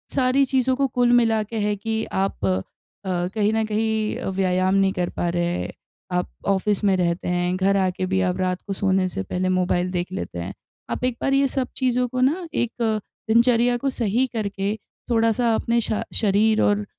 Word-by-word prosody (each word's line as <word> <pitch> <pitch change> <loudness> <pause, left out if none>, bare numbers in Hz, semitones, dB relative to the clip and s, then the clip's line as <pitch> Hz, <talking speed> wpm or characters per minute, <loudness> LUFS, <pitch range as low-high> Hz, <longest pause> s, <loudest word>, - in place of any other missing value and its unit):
सारी 265 0 +3
चीज़ों 260 -1 +1
को 275 +1 +1
कुल 245 -1 +2
मिला 225 -2 +4
के 225 +2 -6
है 210 0 0
कि 220 +2 -2
आप 190 - -2
अ, 95 0 +1 0.7
कहीं 210 -1 +2
न 220 0 +1
कहीं 220 0 0
अ, - - -5
व्यायाम 185 0 +1
नहीं 195 -1 +3
कर 175 -1 -1
पा 175 - -2
रहे, 175 0 -1 0.4
आप 180 0 -1 0.2
ऑफ़िस 200 +1 +1
में 195 -2 +4
रहते 170 -1 0
हैं, 180 0 0
घर 195 +1 +2
आके 185 -1 0
भी 190 +1 0
आप 180 -1 0
रात 185 -1 -1
को 195 - -2
सोने 190 -1 +1
से 95 - -4
पहले 185 - -2
मोबाइल 180 0 +1
देख 180 0 -2
लेते 185 - -5
हैं। 85 - -5 0.4
आप - - -3
एक 250 -2 0
बार 275 - +1
ये 275 0 +4
सब 260 -1 -2
चीज़ों 250 -1 +1
को 255 +1 -3
ना 330 +7 +1
एक 240 -5 0 0.6
दिनचर्या 235 +1 +4
को 275 +3 -1
सही 240 0 +1
करके 200 -2 -2 0.3
थोड़ा-सा 230 0 +2
अपने 235 +1 +1
शा 215 -1 -2
शरीर 215 +1 +3
और 205 0 +2
210 Hz, 195 wpm, -23 LUFS, 185-240 Hz, 0.7 s, मिला